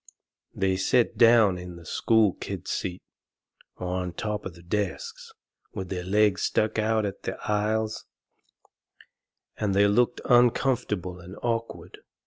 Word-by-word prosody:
They 95 -1 +1
set 115 +5 +2
down 115 -6 +5
in 90 -1 -8
the 85 -1 -13
school 110 +2 +2
kids' - - -6
seats, 90 -1 -4 0.7
or 90 - -5
on 90 -1 -2
top 105 +3 -3
of 90 - -11
the 85 - -15
desks, 455 - -4 0.4
and 95 -3 -5
their 90 -1 -3
legs 100 0 +2
stuck 110 +1 0
out 110 0 +1
into 100 - -4
the - - -4
aisles, 110 +1 -1 1.5
and 100 -3 -1
they 100 +1 +5
looked 120 +4 +2
uncomfortable 120 -7 +2
and 90 +2 -11
awkward. 115 -1 -3
105 Hz, 135 wpm, -26 LUFS, 95-115 Hz, 1.5 s, down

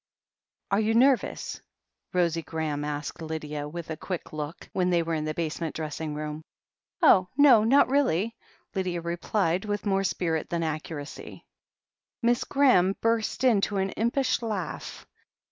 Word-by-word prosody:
"Are 195 - +3
you 220 +1 +1
nervous?" 260 +2 +2 0.5
Rosie 170 -2 +1
Graham 155 -3 -3
asked 150 +2 -4
Lydia 150 -2 -4
with 165 +1 -7
a - - -2
quick 180 -3 -5
look, 150 +1 -6
when 180 -1 +1
they 170 -2 +2
were 165 0 -2
in 155 -1 -1
the 155 0 -3
basement 165 -1 -3
dressing 155 -1 -4
room. 150 0 -5 0.6
"Oh, 185 -2 +6
no, 265 -7 +7
not 265 +6 +5
really," 230 - +1 0.4
Lydia 185 -3 -2
replied, 175 +1 0
with 205 0 -3
more 195 -1 +2
spirit 165 -4 -1
than 170 -1 -1
accuracy. 155 -1 -6 0.8
Miss 240 +1 +3
Graham 225 -10 +4
burst 230 +1 0
into 210 -5 +3
an 190 0 0
impish 245 +3 0
laugh. 210 -8 -4
175 Hz, 145 wpm, -27 LUFS, 160-215 Hz, 0.8 s, no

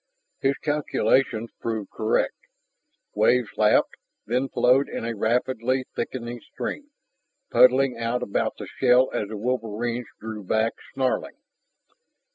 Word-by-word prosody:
His 135 +1 +2
calculations 135 -6 +1
proved 110 -3 -3
correct. 110 -1 +1 0.8
Waves 125 -3 +3
lapped, 105 0 +3 0.3
then 125 +4 0
flowed 130 +4 +3
in - - -4
a 115 0 -3
rapidly 125 +3 0
thickening 120 -1 -4
stream, 295 - -6 0.6
puddling 130 -1 +5
out 115 +1 -1
about 100 - -1
the - - -6
shell 125 0 +3
as 105 - -1
the 110 +1 -6
wolverines 120 0 -2
drew 110 -1 -6
back, 110 +4 +1 0.2
snarling. 130 -1 -1
120 Hz, 115 wpm, -25 LUFS, 110-130 Hz, 0.8 s, puddling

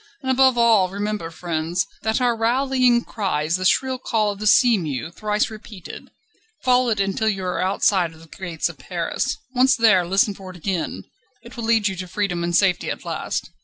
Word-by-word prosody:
And 260 - 0
above 260 -1 +4
all 225 -6 +4
remember, 205 -2 -3
friends, 165 +1 -2 0.2
that 220 +2 0
our 245 -2 +2
rallying 245 +1 +2
cry 195 -8 -2
is 160 +2 0
the 185 - -4
shrill 260 +6 +2
call 215 -4 0
of 200 - -9
the 215 - -2
sea 235 +3 +6
mew 155 - -4
thrice 210 +3 -1
repeated. 215 -4 -10 0.5
Follow 250 -1 +3
it 215 -3 0
until 195 +3 0
you 195 -3 -3
are 180 - -2
outside 185 -2 +1
the 160 0 -16
gates 170 -1 -4
of - - -10
Paris. - - -3 0.2
Once 260 +1 +4
there, 220 -6 +4
listen 195 +3 +2
for 190 -1 -11
it 185 - -10
again; 180 -1 -3 0.4
it - - -12
will 235 -2 -5
lead 225 -2 +3
you 190 - -2
to 185 0 -5
freedom 180 -2 -2
and 175 0 -1
safety 185 -2 +2
at - - -5
last. - - -4
205 Hz, 200 wpm, -22 LUFS, 180-230 Hz, 0.5 s, sea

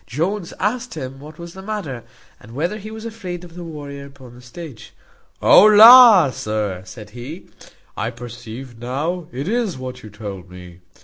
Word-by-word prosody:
Jones 170 - -3
asked 245 0 -2
him 135 -3 -7
what 150 +2 -12
was 170 0 -10
the 190 - -10
matter, 190 - -5 0.4
and 115 +3 -14
whether 175 +9 -2
he 215 +1 -9
was 220 +1 -9
afraid 185 -6 -7
of 175 -2 -13
the 175 0 -8
warrior 145 -3 -8
upon 130 -3 -15
the 125 - -15
stage? 125 -1 -11 0.5
"O - - +8
la! 215 - +9
sir," 105 -5 -3
said 105 +3 -11
he, 130 - -9 0.5
"I 110 - -2
perceive 120 0 -10
now 150 +8 -3
it 135 +5 -5
is 225 - -1
what 130 -1 -7
you 110 - -11
told 100 -3 -9
me. 90 -1 -13
140 Hz, 175 wpm, -20 LUFS, 120-180 Hz, 0.5 s, la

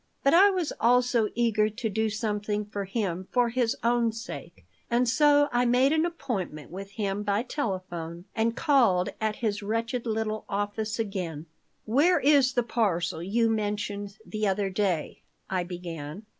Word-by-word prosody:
But 275 - +4
I 385 +4 +8
was 365 -5 -1
also 240 -2 +3
eager 220 -2 +2
to 225 +2 -4
do 220 +1 0
something 210 -1 -2
for 205 -1 -5
him 190 -3 -3
for 245 -1 +2
his 240 -1 0
own 235 -1 +2
sake. 225 +1 -9 0.2
And 245 +1 +2
so 290 +3 +5
I 245 +1 +2
made 255 +4 +4
an 320 +2 +2
appointment 215 - -5
with 195 +2 -8
him 200 -2 -2
by 205 +1 0
telephone 185 - -4
and 225 +1 +1
called 235 - +3
at 215 -1 0
his 210 0 0
wretched 230 +3 -2
little 215 -1 -2
office 205 +2 -2
again 185 -8 -3 0.4
"Where 290 +11 +4
is 275 -2 +4
the 245 - +2
parcel 185 -8 0
you 225 +6 +1
mentioned 205 -2 -2
the 215 -1 -2
other 195 0 0
day?" 185 -5 -1 0.3
I 185 -2 0
began. 175 0 -7
215 Hz, 155 wpm, -27 LUFS, 195-240 Hz, 0.4 s, I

